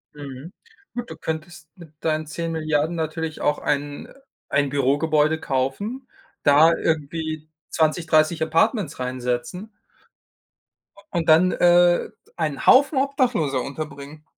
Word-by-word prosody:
Mhm. 140 +3 -9 0.4
Gut, 240 -1 -5
du 160 - -9
könntest 160 0 -6
mit 170 -4 -14
deinen 155 -1 -1
10.000.000.000 160 0 -1
natürlich 160 0 -4
auch 150 - +1
ein 145 0 -3 0.4
ein 140 0 +1
Bürogebäude 150 +3 +1
kaufen, 200 - -3 0.4
da 150 +3 +6
irgendwie 155 0 -2 0.2
20, 160 +1 +1
30 160 0 +2
Apartments 165 - +1
reinsetzen 125 - -3 1.4
und 170 -3 -1
dann, 175 +4 +6
äh, 175 0 +4 0.3
einen 155 -5 -3
Haufen 280 +2 +5
Obdachloser 245 - +1
unterbringen. 145 +2 -8
155 Hz, 110 wpm, -23 LUFS, 145-170 Hz, 1.4 s, da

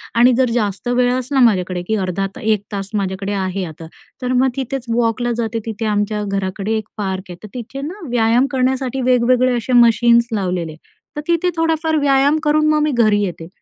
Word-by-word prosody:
आणि 245 +2 +5
जर 255 -2 +2
जास्त 210 -1 -2
वेळ 245 0 +2
असला 255 +2 -1
माझ्याकडे 185 -6 +2
की 220 - +1
अर्धा 190 -1 -1 0.2
1 215 -2 +1
तास 195 -1 -4
माझ्याकडे 195 0 -2
आहे. 190 -1 -2
आता 160 0 -10 0.3
तर 250 0 -1
मग 260 +1 +3
तिथेच 265 -1 -3
वॉकला 240 +1 0
जाते. 230 -1 -2
तिथे 225 0 -4
आमच्या 210 0 -1
घराकडे 195 +2 -2
1 215 0 -5
पार्क 190 -2 -3
आहे. 175 - -8
तर - - -7
तिथे 250 +3 -6
ना 340 +3 -7
व्यायाम 240 +2 +2
करण्यासाठी 260 0 0
वेगवेगळे 250 0 +3
असे 240 +2 -3
मशीन्स 235 0 +5
लावलेले. 180 -6 -2 0.4
तर 295 - -3
तिथे 340 +1 +2
थोडाफार 320 -1 +1
व्यायाम 280 +2 +3
करून 305 +1 +2
मग 305 0 +2
मी 300 - +1
घरी 215 -4 +3
येते. 165 -3 -5
235 Hz, 185 wpm, -18 LUFS, 200-260 Hz, 0.4 s, आणि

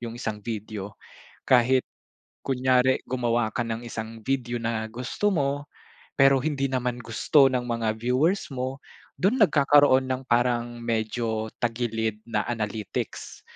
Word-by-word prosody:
yung 115 0 -6
isang 110 -3 -4
video 105 -2 -6 0.5
kahit 130 +1 +4 0.6
kunyari 130 0 +2
gumawa 120 -3 +1
ka 120 +2 -2
ng 115 0 -3
isang 115 -1 -7
video 120 -1 -2
na 115 -1 -1
gusto 125 - -2
mo, 145 -3 -1 0.5
pero 135 0 +5
hindi 135 -1 -1
naman 125 -1 -2
gusto 135 +5 +3
ng 125 -1 -1
mga 115 -2 -1
viewers 130 - +1
mo, 130 +1 -3 0.4
do'n 220 +7 +1
nagkakaroon 145 -6 +5
ng 130 0 -2
parang 120 0 +1
medyo 110 -1 -2
tagilid 115 -2 -2
na 105 -2 0
analytics. 110 -3 -4
120 Hz, 130 wpm, -26 LUFS, 115-130 Hz, 0.6 s, pero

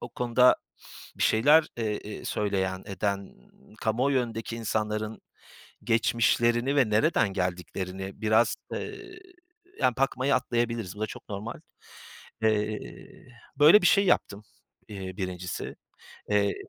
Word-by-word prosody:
o - - -7
konuda 125 +1 +3 0.6
bir - - -1
şeyler, 150 +8 +5
eee, 110 -3 -2
eee, 105 0 -9
söyleyen, 95 -2 -1
eden, 100 0 -3 0.5
kamuoyu 130 +5 +1
önündeki 115 -1 -5
insanların 110 -1 -2 0.6
geçmişlerini 120 +3 +2
ve 130 -6 +3
nereden 110 -2 +2
geldiklerini 95 +1 -4
biraz, 110 +2 +3 0.2
eee, 365 -1 -7 0.6
yani, 125 - +3
bakmayı 135 +1 +1
atlayabiliriz, 120 -5 -1
bu - - -10
da 110 - 0
çok - - -11
normal. 105 +3 -6 0.8
Eee, 110 -1 +1 0.8
böyle 155 +8 +8
bir - - +4
şey 200 +1 +4
yaptım, 100 - +1 0.4
eee, 95 -3 -7
birincisi. 90 -2 -5 0.5
Eee 100 -1 +2
110 Hz, 115 wpm, -27 LUFS, 100-120 Hz, 0.8 s, böyle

